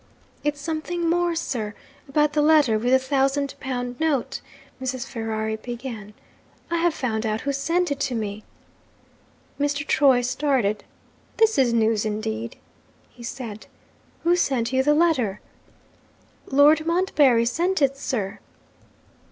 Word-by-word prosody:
'It's 295 Hz, -1 st, -1 dB
something 330 Hz, +3 st, -3 dB
more, 345 Hz, 0 st, +1 dB
sir, 220 Hz, -9 st, -3 dB, 0.3 s
about 300 Hz, +1 st, +2 dB
the 300 Hz, -, +2 dB
letter 295 Hz, -8 st, +4 dB
with 245 Hz, +3 st, 0 dB
the 260 Hz, -, +7 dB
thousand 270 Hz, +1 st, 0 dB
pound 245 Hz, -2 st, -4 dB
note,' 310 Hz, -6 st, 0 dB, 0.4 s
Mrs. 260 Hz, -1 st, -3 dB
Ferrari 220 Hz, -1 st, -3 dB
began. 230 Hz, -3 st, -7 dB, 0.6 s
'I 340 Hz, -, +1 dB
have 340 Hz, 0 st, +2 dB
found 225 Hz, -5 st, -2 dB
out 215 Hz, -1 st, -1 dB
who 280 Hz, -, -1 dB
sent 335 Hz, +5 st, 0 dB
it 280 Hz, -, -2 dB
to 260 Hz, -3 st, -1 dB
me.' 215 Hz, -1 st, -4 dB, 1.2 s
Mr. 290 Hz, +1 st, 0 dB
Troy 265 Hz, -5 st, +4 dB
started. 245 Hz, -5 st, 0 dB, 0.5 s
'This 445 Hz, -5 st, +4 dB
is 255 Hz, -3 st, +4 dB
news 220 Hz, -2 st, +2 dB
indeed!' 220 Hz, +2 st, -3 dB, 0.6 s
he 245 Hz, -, -16 dB
said. 235 Hz, -3 st, -7 dB, 0.6 s
'Who 345 Hz, +1 st, +4 dB
sent 260 Hz, -7 st, 0 dB
you 260 Hz, -, +4 dB
the 295 Hz, +2 st, +3 dB
letter?' 265 Hz, -, +2 dB, 1.1 s
'Lord 300 Hz, +3 st, +5 dB
Montbarry 295 Hz, -9 st, +3 dB
sent 345 Hz, +10 st, 0 dB
it, 275 Hz, -2 st, +2 dB
sir.' 220 Hz, -8 st, -3 dB
265 Hz, 135 wpm, -24 LUFS, 230-300 Hz, 1.2 s, the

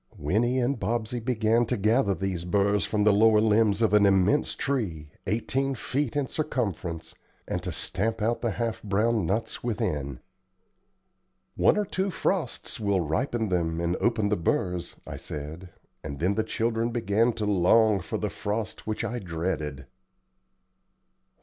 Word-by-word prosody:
Winnie 115 Hz, -, +1 dB
and 125 Hz, +1 st, 0 dB
Bobsey 120 Hz, +1 st, -1 dB
began 115 Hz, -1 st, +2 dB
to 125 Hz, -, 0 dB
gather 105 Hz, 0 st, +2 dB
these 95 Hz, -2 st, -3 dB
burrs 100 Hz, +2 st, +2 dB
from 105 Hz, -1 st, 0 dB
the 105 Hz, 0 st, +5 dB
lower 110 Hz, +1 st, +5 dB
limbs 110 Hz, 0 st, +3 dB
of 110 Hz, -, +2 dB
an 105 Hz, -1 st, +6 dB
immense 95 Hz, +9 st, +3 dB
tree, 90 Hz, -, -2 dB, 0.2 s
eighteen 135 Hz, +6 st, 0 dB
feet 135 Hz, +2 st, -2 dB
in 145 Hz, -1 st, +1 dB
circumference, 100 Hz, -, -3 dB, 0.3 s
and -, -, -2 dB
to -, -, -4 dB
stamp 110 Hz, +3 st, -2 dB
out 115 Hz, +2 st, 0 dB
the 120 Hz, -, 0 dB
half 115 Hz, +1 st, -2 dB
brown 105 Hz, -1 st, +1 dB
nuts 110 Hz, +5 st, -2 dB
within. 75 Hz, -, -2 dB, 1.3 s
"One -, -, +3 dB
or 210 Hz, -, +1 dB
two 190 Hz, +1 st, -1 dB
frosts 170 Hz, -9 st, -2 dB
will 100 Hz, -3 st, +1 dB
ripen 110 Hz, -, -1 dB
them 85 Hz, -3 st, 0 dB
and 85 Hz, +1 st, 0 dB
open 115 Hz, -3 st, +1 dB
the 105 Hz, -, +1 dB
burrs," 90 Hz, +1 st, -1 dB
I -, -, -7 dB
said, 80 Hz, +5 st, -7 dB, 0.3 s
and 70 Hz, -2 st, -5 dB
then 90 Hz, +7 st, +1 dB
the 110 Hz, -, 0 dB
children 115 Hz, 0 st, -1 dB
began 115 Hz, 0 st, +2 dB
to 110 Hz, -2 st, -3 dB
long 105 Hz, +2 st, +4 dB
for -, -, -4 dB
the -, -, -2 dB
frost 110 Hz, +2 st, -4 dB
which 110 Hz, +1 st, -2 dB
I 120 Hz, +1 st, -2 dB
dreaded. 80 Hz, -, -3 dB
105 Hz, 155 wpm, -27 LUFS, 90-115 Hz, 1.3 s, an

